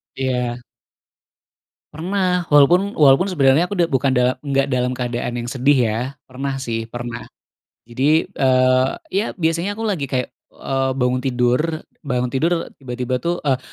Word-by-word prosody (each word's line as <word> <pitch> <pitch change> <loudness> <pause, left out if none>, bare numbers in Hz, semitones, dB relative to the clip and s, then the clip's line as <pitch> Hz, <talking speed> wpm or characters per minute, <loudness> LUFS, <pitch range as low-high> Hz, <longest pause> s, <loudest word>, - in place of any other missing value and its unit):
Iya. 125 -2 -1 1.4
Pernah, 180 +2 0
walaupun 175 +8 +5
walaupun 145 +7 +5
sebenarnya 140 -1 +4
aku 190 +1 -4
udah 170 - +4
bukan 135 -2 +1
da 125 0 +2
enggak 135 -1 +1
dalam 125 -2 0
keadaan 120 -1 -3
yang 120 - -5
sedih, 135 +3 +2
ya, 110 +1 -1 0.3
pernah, 135 +1 -4
sih, 115 -3 -3
pernah. 120 +1 -6 0.7
Jadi, 145 +7 +2
eee, 130 0 +3 0.2
ya, 200 +3 0
biasanya 170 +3 -1
aku 225 - -8
lagi 200 -10 -1
kayak, 130 -2 -2 0.2
eee, 135 0 -1
bangun 125 -1 0
tidur, 125 0 +2 0.5
bangun 125 -2 -1
tidur 165 +7 0
tiba-tiba, 125 -1 -3
tuh, 170 +6 -2
eee, 135 -3 +1
135 Hz, 145 wpm, -20 LUFS, 125-160 Hz, 1.4 s, walaupun